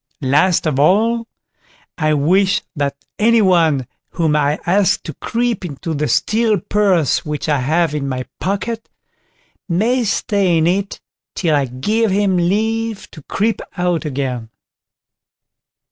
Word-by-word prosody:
Last 150 +8 +2
of 150 -4 0
all, 225 +9 +2 0.7
I 155 -2 +1
wish 185 +7 +2
that 140 -2 -1 0.2
any 230 +2 +4
one 165 -8 +3 0.2
whom 160 -3 0
I 150 0 +1
ask 190 +1 +2
to 155 - -6
creep 235 - -2
into 160 0 -5
the 150 0 -1
steel 220 +2 +1
purse 185 - +1
which 150 -1 -4
I 150 -2 +2
have 155 +4 +1
in 140 -2 -2
my 130 -1 -3
pocket, 205 +5 -3 0.8
may 230 +9 +1
stay 200 -4 +1
in 160 - +2
it 195 +3 -1 0.4
till 165 -4 +1
I 140 -1 +2
give 210 - 0
him 195 -1 +1
leave 220 +4 -1
to 155 - -12
creep 215 +9 -1 0.2
out 175 -2 0
again." 130 -6 -3
175 Hz, 135 wpm, -18 LUFS, 150-205 Hz, 0.8 s, any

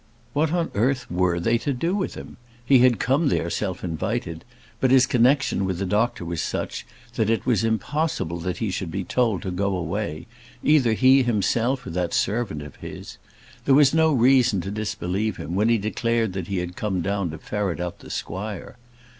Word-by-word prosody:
What 155 +1 +1
on 170 -1 0
earth 125 +5 +1
were 90 -1 +1
they 115 +7 +1
to 140 - -1
do 165 +8 -1
with 200 - -2
him? - - -10 0.3
He 135 +1 +6
had 125 -2 +5
come 135 - +1
there 85 -8 0
self 95 -1 -3
invited; 80 -1 -3 0.4
but 130 - +2
his 130 0 +6
connexion 125 -3 +2
with 95 -2 -1
the 100 - -2
doctor 105 -1 0
was 85 -1 -3
such, - - -4 0.3
that 110 -1 +1
it 115 - 0
was 115 -6 +2
impossible 110 - -1
he 90 +4 -2
should 90 -1 -3
be 95 +4 -3
told 115 -1 0
to 95 - -3
go 95 +1 -1
away, 85 -2 -3 0.4
either 140 -7 +4
he 130 +4 +5
himself, 120 +3 0
or - - -6
that 90 0 -1
servant 100 -9 -1
of 75 -2 -11
his. - - -9 0.5
There 135 - +5
was 145 -1 +5
no 160 0 +4
reason 125 -5 +4
to 95 - -5
disbelieve 105 -1 -2
him 80 - -6
when 105 +5 +2
he 115 - +4
declared 110 0 -1
that 95 -3 -4
he 100 - -2
had 90 0 -4
come 95 -4 -2
down 100 0 -1
to 80 - -6
ferret 100 0 -3
out 90 -1 -4
the - - -13
squire. 100 +3 -5
105 Hz, 195 wpm, -24 LUFS, 90-125 Hz, 0.5 s, He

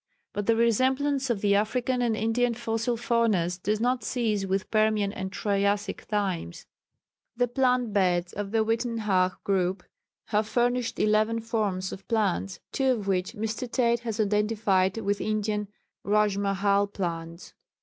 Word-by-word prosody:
But 205 -1 -3
the 230 - +4
resemblance 260 +4 +2
of 220 -5 0
the 205 -1 +3
African 245 +5 +1
and 230 -3 +1
Indian 235 +2 +1
fossil 230 +1 -1
faunas 215 -7 +1
does 210 +2 0
not 245 0 0
cease 215 -5 -1
with 190 0 -2
Permian 215 -2 +2
and 190 -3 -5
Triassic 200 +1 -1
times. 190 - -2 0.7
The 245 0 +2
plant 250 -2 +1
beds 175 -3 +1
of 205 0 -4
the 220 +1 +1
Uitenhage 215 -5 +1
group 185 -1 0 0.5
have 215 0 +1
furnished 245 0 0
eleven 215 +2 +2
forms 210 -5 -2
of 195 - -9
plants, 95 - 0
two 265 -1 +2
of 210 -5 -5
which 185 0 0
Mr. 225 +3 -4
Tate 235 -2 +2
has 225 -2 -5
identified 210 -2 +1
with 205 -2 -1
Indian 210 -1 -1 0.4
Rájmahál 200 -1 +1
plants. 170 -3 -5
215 Hz, 140 wpm, -27 LUFS, 195-230 Hz, 0.7 s, the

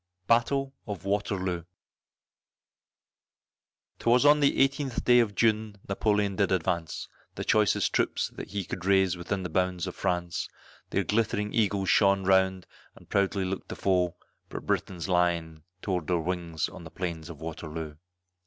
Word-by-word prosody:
BATTLE 135 +5 +2
OF 100 -4 -6
WATERLOO. 95 -4 -1 2.3
'Twas 120 +4 +3
on 145 +1 +7
the 140 -1 +4
18th 135 -2 -4
day 125 0 +6
of 110 -4 +1
June 110 -2 +1
Napoleon 105 0 +1
did 100 -2 +2
advance, 85 -2 -1 0.3
The - - -4
choicest 105 -2 +2
troops - - +1
that - - -8
he 100 -3 -3
could 85 - -6
raise 95 -2 +3
within 90 +3 -3
the 90 - -4
bounds 90 -2 0
of - - -5
France; 85 -1 -2 0.4
Their - - +1
glittering 105 -1 0
eagles 100 -4 +1
shone 100 -2 +4
around 95 -1 +3 0.3
and - - -18
proudly 100 -1 +1
looked 95 +1 -4
the - - -5
foe, 90 -3 +1 0.3
But - - -7
Briton's 90 -2 -2
lion 85 -3 0 0.2
tore 90 -3 0
their 85 +3 0
wings 85 -1 -2
on - - -11
the 80 - -9
plains 85 -2 -5
of 80 -4 -9
Waterloo. 80 -1 -6
95 Hz, 150 wpm, -28 LUFS, 85-105 Hz, 2.3 s, on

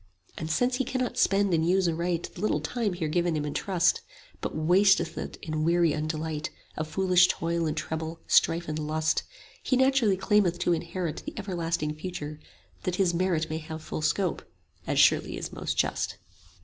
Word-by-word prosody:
And 160 - -5
since 245 +9 +1
he 265 - +1
cannot 255 0 -2
spend 195 -1 +3
and 160 -1 +2
use 185 +2 +3
aright 170 +1 -1
The 175 - -9
little 210 -8 +1
time 210 +6 -2
here 170 -3 -2
given 170 +1 +1
him 150 - -2
in 145 - -3
trust, 180 -3 +1 0.4
But - - -4
wasteth 175 +1 +3
it - - -6
in 155 -1 -2
weary 170 0 +3
undelight 155 0 -3 0.3
Of 155 - -3
foolish 185 +1 +4
toil 170 -2 -1
and 155 +1 -2
trouble, 160 +1 -4
strife 170 +1 +3
and 155 0 -3
lust, 155 +1 0 0.5
25 - - -6
He 255 - +4
naturally 260 -7 +3
claimeth 195 -2 +2
to 175 - +3
inherit 170 0 -3
The - - -8
everlasting 170 -6 -2
Future, 155 -2 -6 0.4
that 180 - -2
his 185 -2 +2
merit 170 -2 +1
May 160 0 -3
have 160 0 -8
full - - -4
scope; 180 +3 0 0.5
as - - 0
surely - - +4
is - - -6
most - - -3
just. - - 0
170 Hz, 185 wpm, -27 LUFS, 155-190 Hz, 0.5 s, foolish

